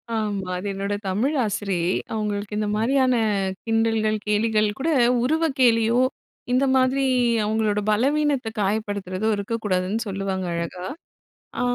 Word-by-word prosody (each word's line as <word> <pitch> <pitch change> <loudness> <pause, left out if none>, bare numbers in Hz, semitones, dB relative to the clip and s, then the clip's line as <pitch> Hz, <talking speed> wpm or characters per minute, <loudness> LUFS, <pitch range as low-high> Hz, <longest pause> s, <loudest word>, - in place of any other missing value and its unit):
ஆமா, 205 -4 -2
அது 185 - -6
என்னோட 200 +1 -3
தமிழ் 240 +11 0
ஆசிரியை. 195 -4 -1 0.2
அவங்களுக்கு 210 -1 -3
இந்த 210 - -1
மாரியான 255 +2 +2 0.5
கிண்டல்கள், 225 -1 +1
கேலிகள் 215 0 +2
கூட 320 +5 0 0.3
உருவக் 315 +1 +1
கேலியோ, 230 0 +4 0.5
இந்த 265 +2 +3
மாதிரி 260 +1 +2 0.4
அவங்களோட 215 -1 +1
பலவீனத்த 275 +2 +1
காயப்படுத்துறதோ 205 -1 -2
இருக்கக் 220 +3 -4
கூடாதுன்னு 185 +3 0
சொல்லுவாங்க 195 -1 -3
அழகா. 170 +2 -4 0.7
ஆ - - 0
215 Hz, 120 wpm, -23 LUFS, 200-240 Hz, 0.7 s, கேலியோ